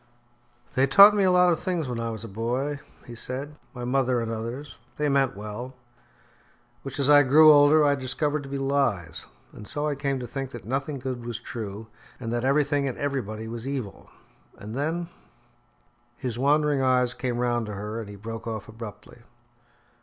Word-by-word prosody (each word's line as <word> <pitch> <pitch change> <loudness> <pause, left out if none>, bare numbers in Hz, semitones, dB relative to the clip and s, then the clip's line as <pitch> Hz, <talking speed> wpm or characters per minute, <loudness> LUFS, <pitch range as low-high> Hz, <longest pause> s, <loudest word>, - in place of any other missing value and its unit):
"They 130 +1 +3
taught 200 +9 +9
me 205 - +3
a - - +4
lot 180 0 +5
of 160 - -3
things 175 -6 -2
when 120 -2 -3
I 115 0 -2
was 110 -1 -6
a - - -6
boy," 125 +7 -2 0.3
he 120 - -9
said, 135 +5 -5
"my 125 -3 -6
mother 125 -1 +1
and 115 -1 -3
others 115 +5 -6 0.2
they 150 0 +1
meant 135 -6 +1
well 105 +5 -7 1.1
which 135 -1 -7
as 140 -2 +2
I 145 0 +8
grew 155 +3 +7
older 145 +1 +6
I 145 - +4
discovered 145 +3 -1
to 135 - -10
be 140 - -3
lies; 135 -11 -1 0.3
and 105 - -10
so 150 +1 -2
I 150 - 0
came 140 -1 -2
to 125 - -5
think 135 +2 -5
that 115 -6 -8
nothing 135 +4 -2
good 130 -2 -5
was 120 -1 -5
true, 110 -3 -6 0.3
and 115 -2 -4
that 120 0 -1
everything 140 +1 +2
and 130 - -4
everybody 110 -6 -3
was 115 +2 -6
evil. 130 -8 -5 0.5
And 105 +2 -8
then 160 +6 -2 0.6
" 120 0 -39 0.3
His 120 -2 -4
wandering 145 +1 +3
eyes 125 -1 +3
came 125 -1 -3
round 120 -2 0
to 105 - -5
her 105 +3 -5
and 110 -3 -7
he 105 - -9
broke 115 +3 -7
off 110 -3 -5
abruptly. 110 0 -10
130 Hz, 190 wpm, -26 LUFS, 115-145 Hz, 1.1 s, taught